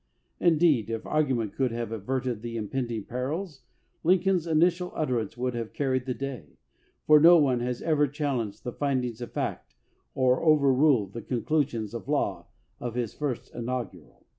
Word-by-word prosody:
Indeed, 155 - +3
if 115 -1 -4
argument 130 -8 0
could 130 -3 0
have 115 -1 -4
averted 125 +1 -2
the 115 0 -5
impending 115 0 -3
perils, 140 - -4 0.4
Lincoln's 180 0 +2
initial 175 +3 +2
utterance 125 -6 -1
would 125 0 -1
have 115 -2 -5
carried 130 -2 -1
the 125 - -1
day, 125 - -7 0.5
for 150 0 +7
no 170 +3 +8
one 135 -6 +3
has 120 0 -3
ever 150 -3 +2
challenged 125 -8 -3
the 125 - -4
findings 125 -5 -1
of 120 - -6
fact - - -4 0.4
or 130 -1 +3
overruled 140 - +4
the 115 - -5
conclusions 120 -2 -1
of 115 -5 -6
law - - -1 0.3
of 120 -1 -5
his 120 -3 -2
first 140 -5 -4
inaugural. 120 -1 -6
130 Hz, 155 wpm, -27 LUFS, 115-150 Hz, 0.5 s, no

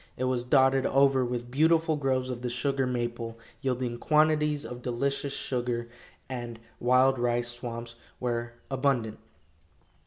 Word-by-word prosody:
It 130 - -2
was 130 -1 +1
dotted 130 +1 +4
over 135 -1 +4
with 120 0 -4
beautiful 160 +3 +3
groves 130 -3 0
of 120 -1 -5
the 125 - -2
sugar 135 +2 0
maple, 120 -2 -3 0.2
yielding 125 -2 -2
quantities 150 -1 +2
of 125 0 -7
delicious 140 +3 -1
sugar, 120 -3 -2 0.4
and 120 -3 -6 0.2
wild 130 +1 +4
rice 120 0 +1
swamps 120 -1 -6 0.3
were 120 -1 -2 0.2
abundant. 130 -5 0
125 Hz, 130 wpm, -28 LUFS, 120-135 Hz, 0.4 s, dotted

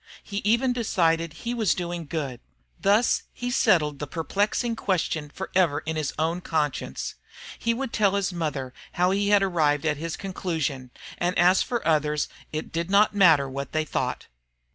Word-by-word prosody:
He 200 - -6
even 235 +5 +2
decided 165 -8 +1
he 230 +10 -5
was 225 -5 +1
doing 175 -2 -4
good. 140 -6 -3 0.4
Thus 210 +4 +3
he 245 0 -4
settled 165 - +3
the 150 - -4
perplexing 205 - -1
question 165 -7 -1
forever 180 -3 0
in 160 +1 -2
his 155 -2 -1
own 165 +3 0
conscience. 150 -5 -2 0.5
He 230 0 +1
would 265 0 -4
tell 200 -2 +3
his 195 -2 0
mother 145 -7 -3 0.2
how 180 +1 +2
he 200 +1 +1
had 205 -1 +5
arrived 155 -5 +1
at 150 -2 +1
his 165 +1 -4
conclusion, 160 -9 -3 0.3
and 175 +1 0
as 180 +2 +5
for 240 -2 -2
others 150 -2 +1 0.2
it 155 0 -4
did 165 +1 -2
not 200 +2 +4
matter 165 -9 +5
what 140 +1 -6
they 155 0 +1
thought. 130 -4 -2
170 Hz, 165 wpm, -25 LUFS, 150-200 Hz, 0.5 s, had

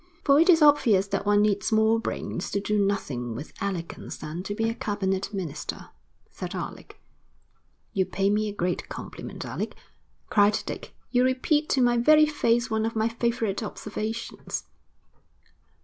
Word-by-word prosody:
'For 280 0 +5
it 335 +3 +4
is 325 -3 +7
obvious 240 -10 +5
that 195 +1 -2
one 205 0 +5
needs 205 0 +1
more 220 +1 +4
brains 185 -4 -4
to 200 - -1
do 210 0 +1
nothing 130 - -2
with 145 +7 -8
elegance 185 -4 -4
than 160 +3 -6
to 205 +2 -4
be 225 +1 0
a 225 - 0
cabinet 195 -3 -2
minister,' 170 -7 -5 0.4
said - - -6
Alec. - - -7 0.9
'You 190 -3 +1
pay 195 +1 +1
me 210 +1 +1
a 205 - -7
great 180 -2 -2
compliment, - - -7
Alec,' - - -4 0.5
cried 205 0 +4
Dick. - - -7 0.2
'You 250 0 +4
repeat 280 +4 +1
to 265 - +2
my 240 0 +3
very 305 +6 +6
face 240 -6 +1
one 220 0 +1
of 230 - -5
my 220 0 +2
favourite 230 -3 -1
observations.' 215 +1 -5
210 Hz, 160 wpm, -26 LUFS, 195-235 Hz, 0.9 s, is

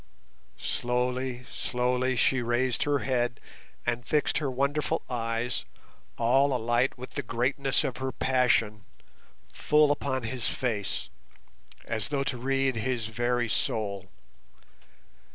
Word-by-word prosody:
Slowly, 125 +1 -1
slowly 125 +1 0
she 130 +2 +3
raised 120 +1 +1
her 145 -1 +1
head, 120 -3 0 0.5
and 120 0 -1
fixed 150 +4 +1
her 145 -3 -1
wonderful 140 +3 0
eyes, 115 0 -1 0.5
all 130 +4 +3
alight 120 +2 +1
with 125 +1 -8
the 140 - -2
greatness 135 +3 +1
of 130 - -2
her 130 0 -2
passion, 120 -6 +2 0.7
full 150 -1 +4
upon 130 -3 -1
his 120 +1 -1
face, 110 -6 -2 0.7
as 110 -2 -3
though 140 -2 0
to 130 -3 -2
read 135 0 +1
his 115 0 -1
very 120 +2 0
soul. 100 -3 -1
125 Hz, 115 wpm, -28 LUFS, 120-135 Hz, 0.7 s, full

